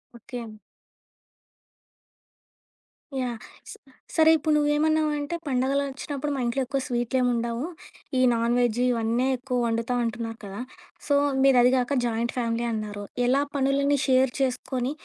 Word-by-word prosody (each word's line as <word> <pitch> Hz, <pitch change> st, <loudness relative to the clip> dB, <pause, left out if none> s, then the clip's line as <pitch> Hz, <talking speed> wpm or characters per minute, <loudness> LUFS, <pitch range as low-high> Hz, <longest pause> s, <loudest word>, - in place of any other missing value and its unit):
Okay. 235 Hz, 0 st, -7 dB, 2.7 s
Yeah! 245 Hz, -2 st, -2 dB, 0.3 s
స -, -, -7 dB, 0.4 s
సరే 320 Hz, -1 st, +6 dB
ఇప్పుడు 310 Hz, +1 st, 0 dB
నువ్వేమన్నావంటే, 300 Hz, +1 st, +1 dB
పండుగలొచ్చినప్పుడు 275 Hz, +2 st, -1 dB
మా -, -, -3 dB
ఇంట్లో 240 Hz, +3 st, 0 dB
ఎక్కువ 275 Hz, +2 st, -1 dB
స్వీట్‌లేమి 245 Hz, +1 st, 0 dB
ఉండవు. 235 Hz, +2 st, -2 dB, 0.5 s
ఈ -, -, +4 dB
నాన్‌వెజ్ 235 Hz, 0 st, +1 dB
ఇవన్నీ 235 Hz, +1 st, +1 dB
ఎక్కువ 250 Hz, 0 st, -3 dB
వండుతం 230 Hz, +2 st, -1 dB
అంటున్నారు 230 Hz, 0 st, -4 dB
కదా! 195 Hz, 0 st, -7 dB, 0.5 s
సో 285 Hz, -, +3 dB, 0.3 s
మీరదిగాక 255 Hz, 0 st, +4 dB
జాయింట్ 235 Hz, 0 st, -1 dB
ఫ్యామిలీ 235 Hz, -1 st, -1 dB
అన్నారు. 210 Hz, -2 st, -4 dB, 0.2 s
ఎలా 265 Hz, +3 st, +3 dB
పనులన్నీ 280 Hz, +1 st, +2 dB
షేర్ 260 Hz, -1 st, +4 dB
చేసుకొని, 255 Hz, 0 st, -1 dB
250 Hz, 110 wpm, -26 LUFS, 235-275 Hz, 2.7 s, సరే